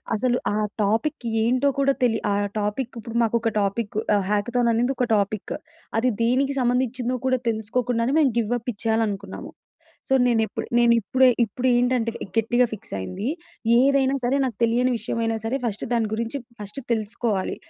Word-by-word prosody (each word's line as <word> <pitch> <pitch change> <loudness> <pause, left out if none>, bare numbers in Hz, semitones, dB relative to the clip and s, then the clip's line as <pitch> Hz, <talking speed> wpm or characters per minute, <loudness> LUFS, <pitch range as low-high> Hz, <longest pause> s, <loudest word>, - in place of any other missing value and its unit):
అసలు 245 +3 +1 0.2
ఆ - - -1 0.3
టాపిక్ 230 +7 0 0.2
ఏంటో 255 +4 +2
కూడా 275 0 +3
తెలి 225 -2 +2
ఆ - - +2 0.3
టాపిక్ 210 +5 -2
ఇప్పుడు 230 +1 -8
మాకు 230 +1 +2
ఒక 225 - 0
టాపిక్ 205 +1 -2 0.2
ఆహ్, 200 -2 +1
హ్యాకథాన్ 235 +3 +1
అనేది 245 +4 +1
ఒక 250 - +1
టాపిక్. 205 0 -1 0.5
అది 250 +1 +2
దేనికి 270 +4 +1
సంబంధించిదో 250 0 0
కూడా 255 -1 +2
తెలుసుకోకుండానే 230 +3 0
మేము 275 -5 +4
గివ్ 230 +1 -1
అప్ 245 +2 -4
ఇచ్చేయాలనుకున్నాము. 220 -1 -2 0.6
సో, 265 - +3
నేను 235 -2 +3
ఎప్పు - - -5 0.2
నేను 235 0 +5
ఇప్పుడే 260 +5 +3 0.2
ఇప్పుడు 245 +4 -4
ఏంటంటే 245 -1 +1
ఫ్ - - -7
గట్టిగా 240 +2 +3
ఫిక్స్ 195 - -9
అయింది. 185 - -5 0.5
ఏదైనా 270 +1 +3
సరే 260 +3 +2
నాకు 250 - -3
తెలియని 245 +2 +2
విషయమైనా 225 0 -1
సరే, 245 +4 0
ఫస్ట్ 215 -3 -2
దాని 225 -2 +1
గురించి 230 +4 -3 0.2
ఫస్ట్ 210 +6 -6
తెలుసుకోవాలి. 215 -2 -1
235 Hz, 165 wpm, -24 LUFS, 220-255 Hz, 0.6 s, నేను